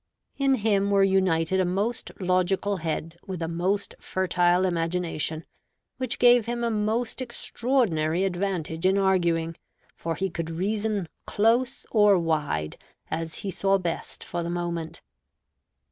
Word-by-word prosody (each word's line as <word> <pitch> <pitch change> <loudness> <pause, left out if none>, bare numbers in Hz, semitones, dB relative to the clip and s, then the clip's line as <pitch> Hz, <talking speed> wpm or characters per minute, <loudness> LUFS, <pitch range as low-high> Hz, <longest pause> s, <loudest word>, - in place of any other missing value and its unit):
In 275 -1 +3
him 205 -3 +1
were 200 -1 +4
united 190 -2 +2
a - - +4
most 205 +7 -1
logical 185 +2 +1
head 165 0 -4
with 185 -3 -4
a 165 - -2
most 185 +5 -1
fertile 180 0 +2
imagination, 165 -2 -1 0.5
which 255 -2 -2
gave 245 -2 +5
him 240 0 -2
a 235 - +1
most 220 +4 -1
extraordinary 230 - 0
advantage 180 -3 -1
in 190 +1 +3
arguing; 170 -4 +2 0.4
for 165 0 -3
he 190 -1 -2
could 165 -1 -4
reason 205 +2 -1 0.2
close 240 +5 +1
or 210 -3 +5
wide, 150 - -1 0.3
as 160 0 -3
he 195 - -1
saw 195 +2 +2
best 175 -3 -4
for 175 - -4
the 170 - -3
moment. 170 -2 -4
185 Hz, 135 wpm, -26 LUFS, 165-205 Hz, 0.5 s, gave